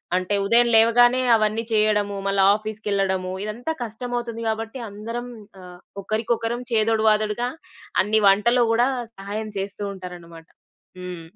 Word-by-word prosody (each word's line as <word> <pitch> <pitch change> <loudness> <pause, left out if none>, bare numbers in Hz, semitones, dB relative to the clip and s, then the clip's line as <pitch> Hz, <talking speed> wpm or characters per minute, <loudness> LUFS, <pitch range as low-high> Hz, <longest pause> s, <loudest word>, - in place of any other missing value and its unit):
అంటే, 185 +2 0
ఉదయం 235 +3 +4
లేవగానే 240 +3 +5
అవన్నీ 215 +1 0
చెయ్యడము, 210 -1 +2
మళ్ళా 195 -1 +2
ఆఫీస్‌కెళ్ళడము, 200 -3 -2
ఇదంతా 240 +9 -4
కష్టమవుతుంది 235 0 -5
గాబట్టి, 225 +3 -4
అందరం 230 +4 -6 0.3
ఆహ్, 180 -1 -12 0.2
ఒకరికొకరం 230 +3 -2
చేదోడు 220 0 +2
వాదోడుగా 215 +3 0 0.5
అన్ని 215 +2 +2
వంటలో 235 +5 +3
గూడా 240 +3 +3 0.3
సహాయం 210 +2 -5
చేస్తూ 200 +1 -5
ఉంటారనమాట. 175 -3 -11 0.5
హ్మ్. 180 -2 -7
215 Hz, 115 wpm, -23 LUFS, 200-230 Hz, 0.5 s, లేవగానే